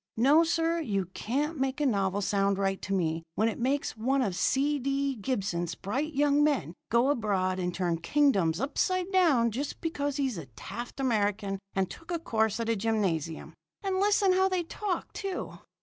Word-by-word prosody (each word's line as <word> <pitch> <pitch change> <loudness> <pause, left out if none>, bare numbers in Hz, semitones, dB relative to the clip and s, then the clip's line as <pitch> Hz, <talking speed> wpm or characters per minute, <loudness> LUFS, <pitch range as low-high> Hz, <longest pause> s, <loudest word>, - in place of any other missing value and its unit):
No, 285 +8 +6
sir, 330 0 +1
you 200 - -1
can't 290 +6 -2
make 265 +1 -1
a 295 - +1
novel 200 -5 +1
sound 200 0 +1
right 195 -1 0
to 195 - -6
me 165 -4 0
when 220 - +2
it 225 - -3
makes 270 +2 0
one 260 +5 +1
of 195 -6 -1
C. 285 +8 +1
D. 275 +1 0
Gibson's 195 -8 -2
bright 270 +10 -3
young 290 +1 +3
men 285 - +1 0.2
go 240 +4 +3
abroad 190 -7 0
and 180 -1 -1
turn 175 -2 -1
kingdoms 190 - +2
upside 365 +7 0
down 300 -12 +4
just 275 +6 -4
because 290 -4 -2
he's 265 -9 -1
a 150 - -9
Taft 240 +6 -7
American 205 -5 0 0.2
and 190 -1 +1
took 330 - -12
a 345 - 0
course 220 - 0
at 230 - -2
a 230 - +2
gymnasium. 195 -8 -1 0.3
And 380 -1 0
listen 400 -1 +4
how 380 +1 +3
they 370 -2 0
talk, 370 +2 -4
too!" 390 -2 -5
245 Hz, 180 wpm, -29 LUFS, 195-295 Hz, 0.3 s, No